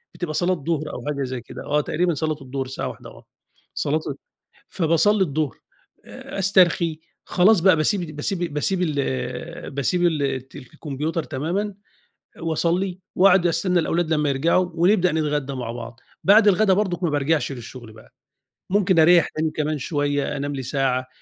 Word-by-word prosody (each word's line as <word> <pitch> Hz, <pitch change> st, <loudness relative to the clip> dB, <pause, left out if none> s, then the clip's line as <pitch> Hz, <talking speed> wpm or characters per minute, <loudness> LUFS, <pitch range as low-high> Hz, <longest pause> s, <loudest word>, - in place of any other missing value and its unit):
بتبقى 165 Hz, -4 st, -4 dB
صلاة 180 Hz, +3 st, +1 dB
ضُهر 155 Hz, -1 st, -2 dB
أو 125 Hz, -, -7 dB
حاجة 140 Hz, -2 st, -2 dB
زي 130 Hz, -2 st, -4 dB
كده -, -, -10 dB
آه، 150 Hz, +1 st, +1 dB
تقريبًا 175 Hz, +3 st, 0 dB
صلاة 155 Hz, +1 st, -2 dB
الضُهر 135 Hz, 0 st, -4 dB
الساعة 130 Hz, -, -4 dB
13:00 -, -, -9 dB
آه، -, -, -16 dB, 0.5 s
صلاة 155 Hz, +2 st, 0 dB, 0.7 s
فباصلِّي 190 Hz, +4 st, +2 dB
الضُهر 150 Hz, -5 st, -2 dB, 0.5 s
أ -, -, -8 dB
أسترخي 175 Hz, -4 st, +3 dB, 0.3 s
خلاص 190 Hz, +2 st, +4 dB
بقى 185 Hz, 0 st, +5 dB
باسيب 160 Hz, 0 st, -1 dB
باسيب 175 Hz, 0 st, -3 dB
باسيب 180 Hz, +5 st, 0 dB
ال 140 Hz, -, -3 dB
باسيب 160 Hz, +6 st, 0 dB
الت 135 Hz, -5 st, -2 dB
الكمبيوتر 150 Hz, +3 st, -4 dB
تمامًا 175 Hz, +9 st, -3 dB, 0.7 s
واصلِّي 175 Hz, +3 st, -1 dB, 0.2 s
واقعد 185 Hz, -1 st, +5 dB
أستنى 175 Hz, +2 st, +1 dB
الأولاد 165 Hz, 0 st, 0 dB
لمّا 150 Hz, -1 st, +1 dB
يرجعوا 170 Hz, +6 st, +1 dB
ونبدأ 180 Hz, 0 st, +3 dB
نتغدى 150 Hz, -3 st, -1 dB
مع 120 Hz, -3 st, -4 dB
بعض. 120 Hz, +1 st, -8 dB, 0.2 s
بعد 205 Hz, +2 st, +6 dB
الغدا 195 Hz, +1 st, +4 dB
برضك 185 Hz, -3 st, -1 dB
ما 165 Hz, -, +1 dB
بارجعش 145 Hz, 0 st, 0 dB
للشغل 120 Hz, -2 st, -10 dB
بقى، 110 Hz, +2 st, -18 dB, 0.6 s
ممكن 190 Hz, -3 st, +3 dB
أريَح 170 Hz, +1 st, +6 dB
تاني 155 Hz, 0 st, -2 dB
كمان 155 Hz, 0 st, -2 dB
شوية، 145 Hz, 0 st, -1 dB
أنام 145 Hz, 0 st, -3 dB
لي 130 Hz, -, -4 dB
ساعة، 130 Hz, -1 st, -1 dB
155 Hz, 155 wpm, -23 LUFS, 140-180 Hz, 0.7 s, بعد